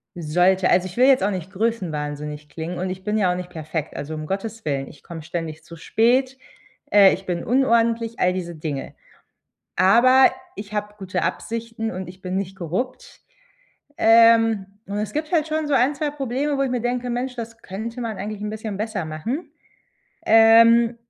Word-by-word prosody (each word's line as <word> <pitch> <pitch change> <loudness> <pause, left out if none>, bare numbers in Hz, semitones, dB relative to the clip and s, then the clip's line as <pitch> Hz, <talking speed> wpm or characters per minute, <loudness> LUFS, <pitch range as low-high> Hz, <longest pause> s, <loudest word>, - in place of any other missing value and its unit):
sollte. 180 +3 +2
Also, 180 +1 +3
ich 180 - -12
will 255 +2 +5
jetzt 265 -7 +5
auch 205 - +1
nicht 185 -1 -5
größenwahnsinnig 150 -8 -3
klingen 165 +3 -6
und 185 +1 -2
ich 185 0 -7
bin 210 +1 -1
ja 190 -4 +2
auch - - -1
nicht 180 -1 -6
perfekt. 160 -1 -5
Also, 145 +2 -5
um 155 0 -6
Gottes 220 +4 -4
Willen, 135 -2 -2
ich 150 - -15
komme 165 -2 -9
ständig 160 -1 -5
zu 170 - -12
spät, 255 +9 +1 0.5
äh, 200 -2 +7
ich 190 - -6
bin 175 -2 -3
unordentlich, 230 -2 +1
all 180 0 +2
diese 175 -2 -5
Dinge. 150 -3 -5 0.8
Aber 255 +7 +6 0.3
ich 205 0 -8
habe 210 0 -3
gute 190 -2 -3
Absichten 230 0 -3
und 185 -1 -6
ich 185 +1 -12
bin 185 0 -3
nicht 190 -1 -4
korrupt. 190 +9 -5 0.8
Ähm, 225 -2 +5 0.2
und 200 - -5
es 210 0 -3
gibt 305 +1 -3
halt 315 -3 +2
schon 310 -1 -2
so 290 - +1
1, 265 +3 +3
2 295 +1 -2
Probleme, 280 +1 -2
wo - - +2
ich 270 - -1
mir 250 -1 -1
denke: 245 0 -2
„Mensch, 250 +2 -3
das 230 -1 -7
könnte 225 +6 -6
man 225 -3 -4
eigentlich 210 +1 -5
'n 210 - -3
bisschen 215 -1 -5
besser 210 -3 -3
machen.“ 160 - -5 0.8
Ähm, 230 +1 +6
210 Hz, 190 wpm, -22 LUFS, 180-235 Hz, 0.8 s, äh